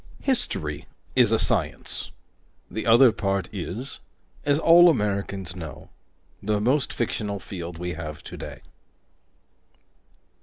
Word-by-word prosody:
History 80 - -1 0.3
is - - +5
a - - +4
science; - - -1 0.6
the 110 - -4
other 120 +2 +7
part 100 -3 -1
is, 105 +7 -4 0.4
as 145 0 +3
all 170 +2 +7
Americans 100 - -1
know, 80 -6 -9 0.5
the 105 0 0
most 130 +6 +2
fictional 105 -3 -2
field 85 -3 -7
we 90 +1 -3
have 75 -3 -7
today. - - -8
100 Hz, 110 wpm, -25 LUFS, 90-125 Hz, 0.6 s, other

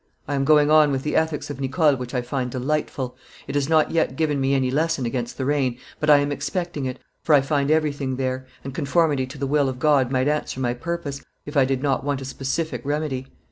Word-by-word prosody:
I 145 - -2
am 135 -1 +1
going 150 0 +5
on 155 -2 +6
with 135 -1 -1
the 150 - -2
Ethics 160 -2 0
of 135 - -7
Nicole, 140 +2 +3
which 125 0 -6
I 125 - 0
find 125 0 -2
delightful; 130 0 -2 0.3
it 135 - -5
has 145 0 0
not 155 -1 +3
yet 160 -5 +1
given 150 -2 0
me 135 +1 +2
any 130 -1 +1
lesson 155 -1 0
against 120 +1 -3
the 130 - -2
rain, 135 -4 +1 0.2
but 150 - 0
I 145 - +9
am 145 0 0
expecting 170 -2 -3
it, 130 0 -4 0.2
for 155 - +4
I 140 - +5
find 140 0 0
everything 145 -4 +1
there, 130 0 -3 0.2
and 135 - -6
conformity 145 -2 +1
to 130 - -10
the 140 - -2
will 140 0 +2
of 130 - -5
God 140 -2 +3
might 130 0 +1
answer 150 -3 -1
my 120 -2 0
purpose, 145 0 -4 0.2
if 145 - -8
I 135 -2 +5
did 135 0 -1
not 135 -2 +1
want 140 -1 -1
a 135 - -7
specific 140 +5 -3
remedy. 145 -2 -2
140 Hz, 235 wpm, -23 LUFS, 130-150 Hz, 0.3 s, I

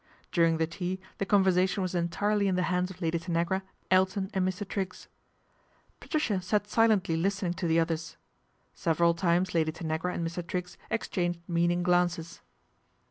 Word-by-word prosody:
During 165 -2 +3
the 160 - +2
tea 180 +3 -4 0.2
the 195 - -1
conversation 190 -1 +3
was 185 - -2
entirely 200 +4 +1
in 190 - +1
he 180 - +2
hands 180 0 0
of 185 -1 -9
Lady 165 0 +1
Tanagra, 170 +2 0 0.3
Elton 190 +1 +2
and 185 -1 +1
Mr. 185 +2 -3
Triggs. 190 -2 -4 0.9
atricia 240 - 0
sat 205 +3 0
silently 210 -6 +3
listening 190 +1 0
to 175 - -3
the 165 0 +3
others. 165 0 -2 0.6
>everal 170 +1 +2
times 175 +1 +1
Lady 160 -2 +2
Tanagra 160 +2 -2
and 170 - -2
Mr. 170 +2 -4
Triggs 180 +1 -4
ex 225 - -1
hanged 175 -2 0
meaning 175 +1 +1
glances. 175 -2 +1
180 Hz, 160 wpm, -29 LUFS, 170-190 Hz, 0.9 s, During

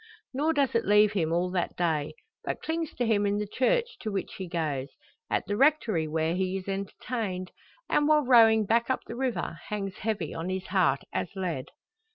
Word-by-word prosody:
Nor 300 +5 +1
does 280 -3 +1
it 230 - +2
leave 210 +1 +5
him 165 -6 0
all 175 +2 +1
that 180 -2 -1
day; 155 -3 -1 0.3
but - - -4
clings 325 -1 -2
to 245 - 0
him 205 -2 +2
in 200 0 +1
the 210 - -1
church, 460 - 0
to 215 - -4
which 195 - -3
he 190 - -4
goes; 150 -6 -2 0.4
at - - 0
the 205 - -2
Rectory, 235 - +3
where 160 +1 0
he 185 +1 -1
is 190 - -8
entertained; 195 -1 -4 0.4
and 295 - +2
while 300 -2 +4
rowing 225 -3 +6
back 230 +4 +2
up 260 - 0
the - - -7
river 245 -9 -2
hangs 195 -2 -4
heavy 210 -7 -2
on 165 +2 -4
his 190 0 -3
heart 185 -8 +2
as - - -1
lead! 175 -9 -3
200 Hz, 200 wpm, -28 LUFS, 180-235 Hz, 0.4 s, rowing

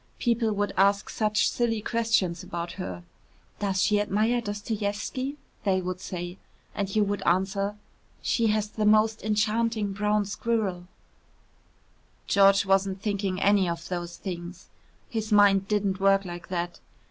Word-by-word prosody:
People 235 -2 +1
would 205 -1 -1
ask 200 +1 +3
such 215 -1 +1
silly 230 -2 0
questions 220 -6 0
about 170 0 -5
her. 90 - -6 0.6
"Does 195 -2 +1
she 210 -1 +3
admire 215 +4 +1
Dostoievski?" 210 +5 -3 0.3
they 190 -2 +2
would 185 0 -4
say, 175 0 -6 0.3
and 200 -1 -3
you 215 - +4
would 205 -1 -2
answer, 195 +3 0 0.4
"She 230 -2 +1
has 215 -1 +1
the 215 0 -1
most 215 +1 +4
enchanting 215 0 0
brown 210 +1 +1
squirrel 200 -4 -2 0.7
" - - -37
George 195 0 +6
wasn't 195 0 +2
thinking 200 -3 -1
any 200 -2 +3
of 170 0 -5
those 175 -1 -4
things. 175 -1 -7 0.4
His 220 -1 -4
mind 200 -2 +5
didn't 200 -2 0
work 195 0 +3
like 175 -1 -7
that. 175 -1 -3
200 Hz, 140 wpm, -27 LUFS, 190-215 Hz, 0.7 s, George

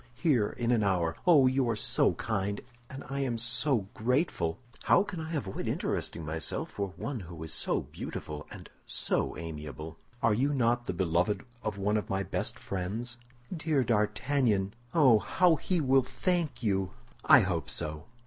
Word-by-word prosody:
"Here, 125 -8 +2
in 120 0 -1
an 115 -3 +3
hour. 85 -4 +1
Oh, 150 -7 +7
you 130 -1 +2
are 115 - +1
so - - +2
kind, 100 -2 -2 0.3
and 135 - -8
I 140 +2 -3
am 130 -4 0
so 120 -1 +1
grateful!" 125 - 0 0.3
"How 190 - +5
can 190 -4 -6
I 160 +1 -4
avoid 105 -10 -3
interesting 80 - -2
myself 80 +1 -3
for 100 -2 -3
one 140 -4 -3
who 85 -4 -8
is 80 - -5
so - - +1
beautiful 75 0 -7
and - - -10 0.2
so - - -1
amiable? 75 0 -7 0.2
Are 115 - +4
you 140 +6 +1
not 120 -1 +2
the 90 - -2
beloved 90 +4 0 0.2
of 105 -3 -3
one 105 +2 +1
of 105 - -3
my 95 0 0
best - - -3
friends?" 105 +6 -4 0.4
"Dear 155 -4 +1
D'Artagnan! 105 -1 +1 0.2
Oh, 130 -9 +6
how 175 - +3
he 180 +3 0
will 135 -2 +4
thank 150 +3 -1
you!" 95 -4 0 0.3
"I - - +8
hope 85 -8 -1
so. 75 +4 -4
110 Hz, 170 wpm, -30 LUFS, 95-135 Hz, 0.4 s, I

